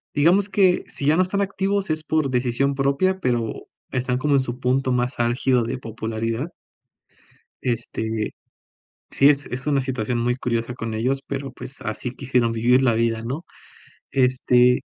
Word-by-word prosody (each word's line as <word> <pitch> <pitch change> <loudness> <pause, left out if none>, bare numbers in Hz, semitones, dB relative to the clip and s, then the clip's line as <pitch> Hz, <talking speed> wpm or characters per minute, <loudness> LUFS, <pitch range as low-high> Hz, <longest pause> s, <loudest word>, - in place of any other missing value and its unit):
digamos 180 +7 +4
que 190 -3 +3
si 140 - -4
ya 150 +2 +4
no 185 - +4
están 185 +2 0
activos 195 -1 -1
es 155 0 -1
por 155 -3 0
decisión 130 +2 0
propia, 140 +8 +1
pero 120 -8 -2 0.2
están 125 -1 0
como 145 +2 +2
en 135 - +3
su 125 0 -5
punto 130 +1 +1
más 125 +1 -1
álgido 120 +1 +2
de 120 +3 -3
popularidad. 115 +4 -4 1.1
Este, 115 -2 -2 0.8
sí 140 +1 +5
es 140 -1 +2
es 130 +3 -3
una 140 -2 +2
situación 125 -2 -2
muy 120 +1 +1
curiosa 120 -1 -2
con 115 -2 -4
ellos, 130 +5 0
pero 140 0 -4
pues 135 - -8
así 110 +3 -3
quisieron 125 -3 0
vivir 120 +3 +3
la 120 -3 +4
vida, 115 0 0
¿no? 135 +8 -4 0.7
Este 125 -1 +3
130 Hz, 160 wpm, -23 LUFS, 120-140 Hz, 1.1 s, sí